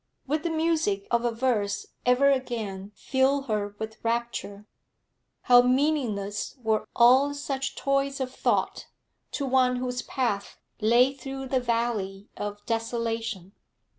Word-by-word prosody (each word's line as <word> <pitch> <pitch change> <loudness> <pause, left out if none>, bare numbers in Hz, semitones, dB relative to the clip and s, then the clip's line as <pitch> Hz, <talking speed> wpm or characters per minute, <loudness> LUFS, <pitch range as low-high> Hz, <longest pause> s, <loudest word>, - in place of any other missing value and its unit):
Would 300 +3 -1
the 340 - -2
music 315 -11 0
of 235 0 +2
a 240 - +2
verse 225 -4 0 0.2
ever 265 +3 +5
again 215 -7 -3
fill 270 +1 +1
her 210 -4 -2
with 220 +1 -7
rapture? 230 -3 -3 0.8
How 245 -1 +7
meaningless 250 -7 0
were 220 -1 0
all 260 +4 +5
such 275 -2 -3
toys 275 0 0
of 260 -1 -3
thought - - 0 0.5
to 280 - -2
one 255 -1 +3
whose 250 0 -2
path 220 -7 -2 0.2
lay 240 +4 +4
through 270 0 -7
the 260 - +2
valley 230 -5 -2
of 205 0 -6
desolation! 225 -4 -2
245 Hz, 130 wpm, -27 LUFS, 215-270 Hz, 0.8 s, How